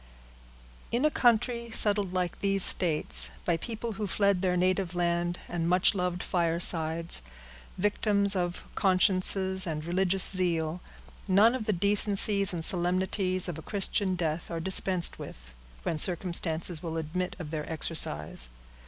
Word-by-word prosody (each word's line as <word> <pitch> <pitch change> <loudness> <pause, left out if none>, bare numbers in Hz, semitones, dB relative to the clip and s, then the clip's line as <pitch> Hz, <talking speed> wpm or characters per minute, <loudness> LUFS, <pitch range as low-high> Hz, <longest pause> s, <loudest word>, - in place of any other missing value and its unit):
In 245 +5 0
a 305 - +2
country 235 -1 +1
settled, 205 -4 0
like 180 -2 -3
these 195 -1 0
states, 160 -4 +3 0.2
by 175 - +1
a - - -1
people 230 +3 -6
who 210 0 -5
fled 200 -1 0
their 180 -1 0
native 185 0 -1
land 175 0 -1
and 170 -1 -3
much 180 +1 +4
loved 180 -2 -3
firesides, 165 - +1 0.6
victims 200 0 +3
of 175 -1 -3
consciences 190 -1 +2
and 155 -1 -5
religious 185 +2 +1
zeal, 175 -3 -2 0.5
none 205 +5 +4
of 255 -4 -4
the 215 - 0
decencies 200 +1 +2
and 165 -3 -1
solemnities 185 +1 0
of 165 -3 -6
a - - -9
Christian 195 0 0
death 165 -1 -3
are 165 - -4
dispensed 185 0 +3
with, - - -11 0.3
when 155 - -2
circumstances 170 -1 0
will 165 -2 -5
admit 175 +3 -4
of 155 -4 -8
their 155 0 -5
exercise. 75 - -2
180 Hz, 145 wpm, -28 LUFS, 170-195 Hz, 0.6 s, much